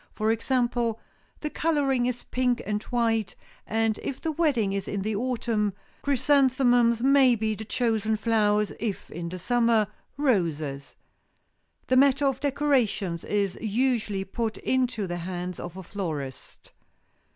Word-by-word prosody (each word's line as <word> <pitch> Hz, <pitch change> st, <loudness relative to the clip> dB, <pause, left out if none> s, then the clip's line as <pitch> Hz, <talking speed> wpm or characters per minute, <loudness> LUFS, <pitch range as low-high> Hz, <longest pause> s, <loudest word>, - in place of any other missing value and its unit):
For 215 Hz, +1 st, +1 dB
example, 240 Hz, -1 st, 0 dB, 0.4 s
the 300 Hz, -, -3 dB
coloring 275 Hz, -6 st, +1 dB
is 250 Hz, -1 st, -3 dB
pink 250 Hz, -1 st, 0 dB
and 210 Hz, 0 st, -1 dB
white, 225 Hz, -4 st, 0 dB, 0.3 s
and 225 Hz, -1 st, 0 dB
if 270 Hz, -, -4 dB
the 325 Hz, -, -2 dB
wedding 280 Hz, -11 st, +1 dB
is 195 Hz, -1 st, -3 dB
in 200 Hz, -1 st, -2 dB
the 215 Hz, +1 st, -1 dB
autumn, 225 Hz, -3 st, -1 dB, 0.3 s
chrysanthemums 255 Hz, -4 st, +3 dB
may 270 Hz, -2 st, +5 dB
be 220 Hz, -1 st, -1 dB
the 220 Hz, +1 st, -7 dB
chosen 220 Hz, -1 st, 0 dB
flowers, 210 Hz, -1 st, +2 dB
if 215 Hz, -4 st, -4 dB
in 170 Hz, +1 st, -5 dB
the 185 Hz, -, -6 dB
summer, 230 Hz, +2 st, +2 dB, 0.3 s
roses. 160 Hz, -, -1 dB, 0.9 s
The 255 Hz, -, +2 dB
matter 275 Hz, +1 st, +4 dB
of 270 Hz, -2 st, +1 dB
decorations 255 Hz, -, 0 dB
is 200 Hz, -3 st, -1 dB
usually 220 Hz, -3 st, 0 dB
put 225 Hz, +3 st, -3 dB
into 250 Hz, -5 st, 0 dB
the 175 Hz, -1 st, -4 dB
hands 180 Hz, 0 st, -5 dB
of 175 Hz, +1 st, -7 dB
a 190 Hz, -, -7 dB
florist. 155 Hz, -9 st, -6 dB
225 Hz, 140 wpm, -26 LUFS, 200-255 Hz, 0.9 s, may